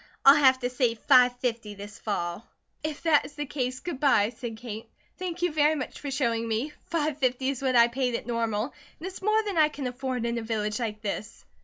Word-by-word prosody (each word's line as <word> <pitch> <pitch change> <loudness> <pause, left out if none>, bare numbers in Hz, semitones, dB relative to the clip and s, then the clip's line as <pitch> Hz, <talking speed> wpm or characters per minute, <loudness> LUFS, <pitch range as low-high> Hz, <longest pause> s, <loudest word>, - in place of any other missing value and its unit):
I'll 275 - +11
have 260 -1 +7
to 245 - 0
say 245 -2 +1
five 250 +1 +5
fifty 230 -4 -2
this 205 +1 -10
fall." 175 -1 -3 0.4
"If 310 -1 -4
that 320 -3 +4
is 290 - -11
the 295 0 -3
case, 255 -3 -3
good 345 -7 -5
bye," 220 -8 +4
said 225 -1 -6
Kate. 225 -1 -7 0.3
"Thank 360 -1 -4
you 355 - +2
very 305 0 +4
much 265 -4 -5
for 285 - -5
showing 235 -4 0
me. 230 +7 -1
Five 305 -3 -1
fifty 260 0 +1
is 275 -2 -3
what 260 -2 +1
I 235 -1 +7
paid 250 0 -1
at - - -4
Normal, 230 0 -1 0.3
it 330 - -7
is 380 +1 -7
more 430 +2 +2
than 400 -6 -1
I 305 -1 +6
can 285 -3 -6
afford 250 -1 -3
in 235 0 -1
a - - -5
village 215 -1 -2
like 215 -2 -4
this." 210 +2 -5
250 Hz, 225 wpm, -27 LUFS, 230-290 Hz, 0.4 s, I'll